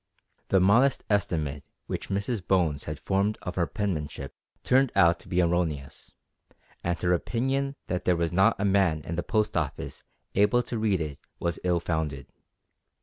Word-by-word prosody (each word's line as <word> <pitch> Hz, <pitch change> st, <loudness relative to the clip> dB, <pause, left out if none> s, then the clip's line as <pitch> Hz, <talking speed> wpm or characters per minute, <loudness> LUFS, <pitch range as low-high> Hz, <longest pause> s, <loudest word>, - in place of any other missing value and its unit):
The 95 Hz, -, +4 dB
modest 115 Hz, +9 st, +4 dB
estimate 75 Hz, -8 st, 0 dB, 0.2 s
which -, -, -5 dB
Mrs 100 Hz, 0 st, -2 dB
Bones 85 Hz, -7 st, +1 dB
had 75 Hz, -1 st, -5 dB
formed 100 Hz, +5 st, 0 dB
of 90 Hz, -, -4 dB
her 85 Hz, -2 st, 0 dB
penmanship 75 Hz, -9 st, -3 dB, 0.3 s
turned 130 Hz, 0 st, +3 dB
out 85 Hz, 0 st, +5 dB
to -, -, -13 dB
be 90 Hz, 0 st, +2 dB
erroneous, 85 Hz, -5 st, -2 dB, 0.7 s
and 85 Hz, 0 st, -1 dB
her 90 Hz, 0 st, +3 dB
opinion 135 Hz, +8 st, -1 dB
that 90 Hz, -1 st, -3 dB
there 90 Hz, -, +4 dB
was 85 Hz, -1 st, 0 dB
not 95 Hz, +2 st, +4 dB
a 105 Hz, -, +1 dB
man 95 Hz, -6 st, +3 dB
in 85 Hz, -, -4 dB
the 85 Hz, -, -1 dB
Post 105 Hz, +4 st, 0 dB
Office 75 Hz, -5 st, -3 dB, 0.3 s
able 115 Hz, +5 st, +3 dB
to 120 Hz, -1 st, -4 dB
read 105 Hz, -5 st, +1 dB
it 75 Hz, -3 st, -4 dB, 0.2 s
was 85 Hz, -2 st, -1 dB
ill 90 Hz, -1 st, +2 dB
founded. 80 Hz, -5 st, -2 dB
90 Hz, 165 wpm, -27 LUFS, 80-105 Hz, 0.7 s, out